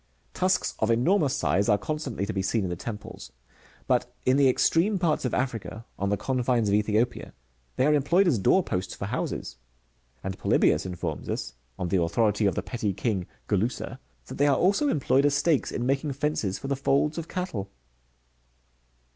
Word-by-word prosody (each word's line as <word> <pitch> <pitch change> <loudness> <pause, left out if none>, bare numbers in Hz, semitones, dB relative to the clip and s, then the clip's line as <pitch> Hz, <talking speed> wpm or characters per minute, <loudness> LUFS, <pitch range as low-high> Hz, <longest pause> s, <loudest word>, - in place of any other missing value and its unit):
^ - - -39
Tusks 185 +1 +1
of 110 - +1
enormous 145 - +2
size 100 -5 +1
are 105 - +5
constantly 140 -7 -3
to 105 - -4
be 95 - -1
seen 100 +3 0
in 90 - -2
the - - -2
temples; 105 - -8 0.5
but, - - +1
in 130 - +4
the 140 -1 +5
extreme 175 +10 +2
parts 165 -6 0
of 125 - -1
Africa, 115 -3 -3
on 100 - 0
the 100 - +1
confines 125 -4 0
of - - +1
Ethi 105 0 +1
opia, 120 +3 0 0.4
they 130 - +2
are 150 - +4
employed 170 +7 +3
as 125 -11 +2
door 185 - +4
posts 90 - -3
for - - -5
houses; - - -4 0.7
and 95 0 -5
Polybius - - +2
informs 85 -4 -5
us, - - -3 0.2
on 90 - -3
the 90 0 +2
authority 105 +4 +2
of 95 - 0
the - - -2
petty 110 -5 -2
king 95 -3 -2 0.2
Gulussa,"*^ 115 +5 -1 0.3
that - - -9
they 145 - +4
are 140 - +3
also 200 +11 +2
employed 140 - +2
as 145 - +1
stakes 150 0 +1
in 120 - -2
making 135 +2 0
fences 135 -9 -1
for - - -7
the 140 - 0
folds 140 +4 +1
of 165 - -6
cattle. 165 - -4
125 Hz, 190 wpm, -26 LUFS, 100-145 Hz, 0.7 s, are